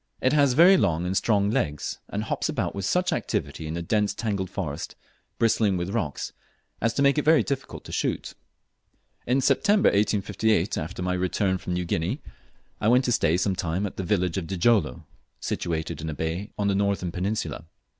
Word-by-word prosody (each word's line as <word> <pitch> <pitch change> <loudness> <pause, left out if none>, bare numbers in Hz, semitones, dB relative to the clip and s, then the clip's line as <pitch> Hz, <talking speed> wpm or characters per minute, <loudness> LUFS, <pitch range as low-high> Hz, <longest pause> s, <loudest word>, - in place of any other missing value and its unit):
It 130 - +2
has 140 -3 +4
very 175 +7 +7
long 85 - +1
and 90 +1 -1
strong 100 -1 +2
legs, 75 -9 -2
and 105 +1 -3
hops 110 - -2
about - - -2
with 100 -1 -4
such 180 - +1
activity 75 - -3
in 80 - -4
the 85 - -3
dense 105 +3 +1
tangled 100 -5 -2
forest, 85 -8 -5 0.4
bristling 110 -4 +2
with 90 +2 -3
rocks, 100 -11 -3 0.5
as 115 - +2
to 140 - +2
make 140 +2 +4
it - - -1
very 160 +1 +5
difficult 135 -1 -4
to - - -10
shoot. - - -2 0.9
In 130 +3 +2
September 200 +10 +4
1858, 105 -1 +1
after 90 +3 -4
my 90 0 0
return 95 +1 0
from 90 - -4
New 90 0 -1
Guinea, 85 - -1 0.6
I 105 - 0
went 125 +3 +4
to 120 - +1
stay 85 -7 +2
some 95 +1 0
time 90 +3 -1
at 100 - -6
the 95 - -2
village 90 -2 0
of 85 - -7
Djilolo, 95 - +1 0.4
situated 80 -2 -3
in 80 - -4
a 75 - -4
bay 80 +7 -3
on 100 - 0
the 100 - +2
northern 100 -3 0
peninsula. 90 -4 -3
100 Hz, 190 wpm, -26 LUFS, 85-115 Hz, 0.9 s, very